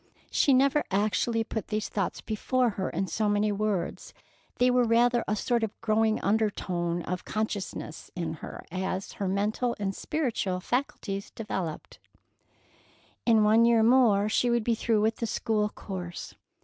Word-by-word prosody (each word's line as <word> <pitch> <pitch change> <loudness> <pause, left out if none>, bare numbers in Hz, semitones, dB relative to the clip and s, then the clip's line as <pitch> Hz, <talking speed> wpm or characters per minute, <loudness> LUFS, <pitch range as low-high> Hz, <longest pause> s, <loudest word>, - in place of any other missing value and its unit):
She 280 - +3
never 275 +3 +4
actually 215 +3 +1
put 220 -1 -5
these 215 0 -2
thoughts 195 -3 -2
before 245 +3 0
her 190 -2 -3
in 190 +4 -1
so 210 +3 0
many 205 +1 +2
words. 205 -3 -2 0.4
They 250 0 +4
were 250 0 +4
rather 240 +1 +3
a 210 - +1
sort 235 +2 0
of 220 - -4
growing 220 0 +2
undertone 180 -5 0
of 180 +2 -4
consciousness 205 -7 -4
in 170 -3 -3
her, - - -8
as 190 +1 -3
her 195 - +1
mental 210 +5 0
and 195 -1 -2
spiritual 235 -11 -1
faculties 200 -3 -3
developed. 190 -7 -5 1.3
In 225 -2 +5
one 220 +2 +5
year 230 -1 +5
more 225 -4 +5
she 240 +3 +2
would 235 -1 +2
be 235 - +2
through 225 -1 +1
with 220 +1 +1
the 230 - -2
school 215 -1 0
course. 180 -4 -7
215 Hz, 155 wpm, -28 LUFS, 195-235 Hz, 1.3 s, In